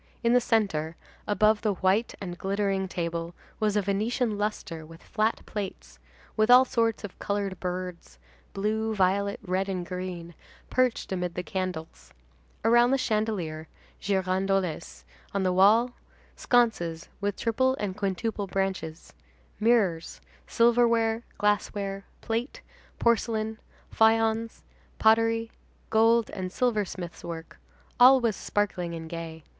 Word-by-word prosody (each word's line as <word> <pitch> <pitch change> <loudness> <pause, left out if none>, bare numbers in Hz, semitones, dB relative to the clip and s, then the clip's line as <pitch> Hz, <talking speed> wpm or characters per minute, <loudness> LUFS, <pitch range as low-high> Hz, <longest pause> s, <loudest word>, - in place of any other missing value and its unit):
In 235 0 +3
the 250 - +5
centre, 180 -9 0 0.3
above 215 +1 +3
the 210 -3 0
white 190 +6 +1
and 180 -3 -5
glittering 195 +1 -1
table, 170 -1 -4 0.2
was 215 -2 +1
a 210 - +2
Venetian 215 +4 0
lustre 205 -5 -3
with 165 +2 -14
flat 220 0 -1
plates, 200 -3 -6 0.4
with 215 +1 +2
all 250 +1 +8
sorts 230 -3 0
of 205 - -8
colored 200 -2 -2
birds, 180 - -5 0.4
blue, 220 +2 -1
violet, 200 +3 +1
red, 190 0 -1
and 180 -2 -3
green, 180 -2 -6 0.4
perched 255 -5 +1
amid 180 -2 -2
the 180 - -3
candles; 180 -4 -5 0.5
around 240 +1 +5
the 270 - +3
chandelier, 210 -10 -2 0.3
girandoles, 190 -3 -1 0.3
on 195 - +1
the 185 -1 +1
walls, 215 +6 +5 0.4
sconces 195 -10 +1
with 200 -1 -1
triple 260 +3 +1
and 200 -3 -3
quintuple 200 +1 -2
branches; 190 -4 -3 0.5
mirrors, 210 -7 +1 0.3
silverware, 230 -1 +3 0.2
glassware, 200 -1 -1 0.2
plate, 230 +4 -3 0.3
porcelain, 220 -1 0 0.4
faïence, 225 0 +2 0.3
pottery, 225 +1 +3 0.4
gold 225 +1 +4
and 185 -1 -5
silversmith's 200 -7 -2
work, 165 -1 -8 0.4
all 260 +2 +8
was 230 -4 0
sparkling 180 -5 -2
and 165 -1 -7
gay. 165 -1 -7
200 Hz, 120 wpm, -27 LUFS, 185-225 Hz, 0.5 s, all